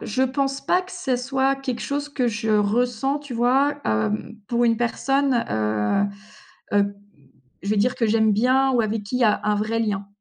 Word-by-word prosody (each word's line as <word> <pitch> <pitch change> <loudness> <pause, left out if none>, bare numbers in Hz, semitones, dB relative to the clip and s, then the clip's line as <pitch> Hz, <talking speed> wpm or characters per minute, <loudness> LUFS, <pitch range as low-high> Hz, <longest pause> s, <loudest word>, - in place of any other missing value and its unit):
je 240 +5 -1
pense 270 +1 0
pas 360 - +3
que 370 - -13
ce 300 -9 -1
soit 265 +2 0
quelque 265 -3 -4
chose 285 +1 -3
que 265 -4 0
je 220 0 -2
ressens, 240 +6 +1
tu 285 -4 -8
vois, 265 +5 +2
hem, 105 - -1
pour 240 +1 +1
une 230 -1 +3
personne, 260 +2 +1
heu, 110 - +1 0.7
heu, 200 0 +2 0.7
je 200 - -5
vais 215 - +2
dire 230 +5 +2
que 230 - 0
j'aime 220 0 +3
bien 255 +5 +3
ou 245 - +3
avec 220 -1 -1
qu'il 250 +5 -3
y 250 - +3
a 210 -2 +3
un 210 - +2
vrai 215 +2 -1
lien. 205 -3 -2
240 Hz, 195 wpm, -23 LUFS, 210-270 Hz, 0.7 s, pas